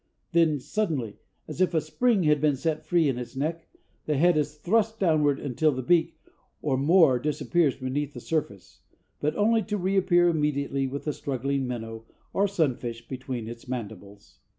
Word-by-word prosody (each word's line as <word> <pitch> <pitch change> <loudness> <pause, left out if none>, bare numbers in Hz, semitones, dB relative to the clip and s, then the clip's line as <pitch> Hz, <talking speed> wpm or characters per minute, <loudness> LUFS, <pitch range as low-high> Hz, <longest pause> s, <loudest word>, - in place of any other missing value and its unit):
Then 165 -4 +3
suddenly, 145 - -2 0.3
as 155 +3 -5
if 185 -2 +2
a - - +4
spring 195 +7 +1
had 150 -2 +3
been 150 -2 +3
set 155 +3 -2
free 170 -3 +3
in 130 -3 -1
its 125 +2 -8
neck, 160 +4 -3 0.4
the 150 -2 +1
head 175 +3 +4
is 150 0 -1
thrust 220 +7 +1
downward 150 -6 +2
until 145 +3 +1
the 130 -1 -4
beak, 165 +2 +2 0.4
or 140 -3 0
more, 145 -1 +4
disappears 150 +1 +1
beneath 135 +2 -3
the - - -6
surface, 140 - -4 0.4
but 150 - -1
only 225 +2 +3
to 210 -1 -3
reappear 185 -2 +3
immediately 140 -4 0
with 140 +2 -5
the 150 - -1
struggling 135 0 -2
minnow 115 -2 -6 0.3
or 200 +1 +2
sunfish 125 -10 -2
between 130 -3 -5
its 115 +1 -9
mandibles. 105 -5 -8
150 Hz, 170 wpm, -26 LUFS, 130-170 Hz, 0.4 s, a